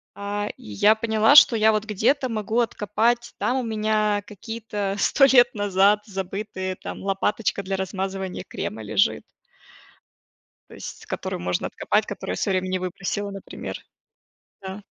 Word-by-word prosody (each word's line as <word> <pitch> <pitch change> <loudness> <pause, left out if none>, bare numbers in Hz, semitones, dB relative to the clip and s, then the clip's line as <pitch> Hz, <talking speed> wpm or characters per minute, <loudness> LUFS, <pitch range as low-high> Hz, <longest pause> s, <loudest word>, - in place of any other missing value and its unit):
а, 205 +1 -3
и - - -18
я 205 - +5
поняла, 220 +2 +3
что 250 -5 +9
я, 220 0 +4
вот 215 0 -1
где-то 240 +6 +1
могу 220 +1 -1
откопать, 235 +2 0
там 255 - +1
у 255 - -1
меня 215 -2 0
какие-то 210 -2 -4
100 275 - +5
лет 245 -3 +5
назад 205 +1 +3
забытые 190 -1 -4
там, - - -8
лопаточка 200 +1 -1
для 195 +1 -2
размазывания 190 -1 -4
крема 110 +1 -5
лежит. 105 - +1 1.5
То - - -12
есть - - -9
которую - - -4
можно 90 0 -1
откопать, - - 0
которую 90 - -5
я - - -2
в - - -4
своё 190 -2 +1
время 185 0 -5
не 185 - 0
выбросила, 195 +2 -3
например. 195 - -7 0.9
Да. 190 +2 -7
205 Hz, 150 wpm, -24 LUFS, 190-220 Hz, 1.5 s, что